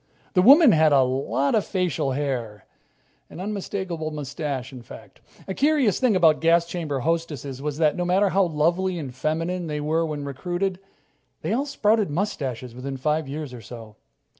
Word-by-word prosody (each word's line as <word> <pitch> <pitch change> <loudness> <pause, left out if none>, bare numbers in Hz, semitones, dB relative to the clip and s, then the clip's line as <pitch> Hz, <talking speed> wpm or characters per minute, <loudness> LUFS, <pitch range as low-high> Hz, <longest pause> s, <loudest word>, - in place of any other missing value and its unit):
The 180 - +4
woman 280 - +8
had 155 -3 +4
a 135 -2 +6
lot 135 +2 0
of 215 - +3
facial 180 -8 -1
hair 120 -7 -3 0.6
an - - -10
unmistakable 190 -5 -4
mustache, 140 -3 -5
in 125 - -9
fact. - - -14 0.3
A 190 - -3
curious 280 - +2
thing 250 -6 +3
about 165 -4 +4
gas 165 +1 +4
chamber 160 -6 -3
hostesses 145 -4 -2
was 150 0 -3
that, 155 -2 +2
no 180 - -1
matter 190 +3 +2
how 195 +1 +3
lovely 175 +3 0
and 140 -6 -6
feminine 165 +5 -2
they 150 -1 -3
were 155 +3 0
when 150 -3 -4
recruited, 175 +7 -3 0.6
they - - -1
all 275 +5 0
sprouted 215 - +1
mustaches 135 - -3
within 135 +2 -6
five 150 +2 -1
years 145 -1 -6
or 120 - -9
so. 110 -1 -11
160 Hz, 170 wpm, -24 LUFS, 140-185 Hz, 0.6 s, woman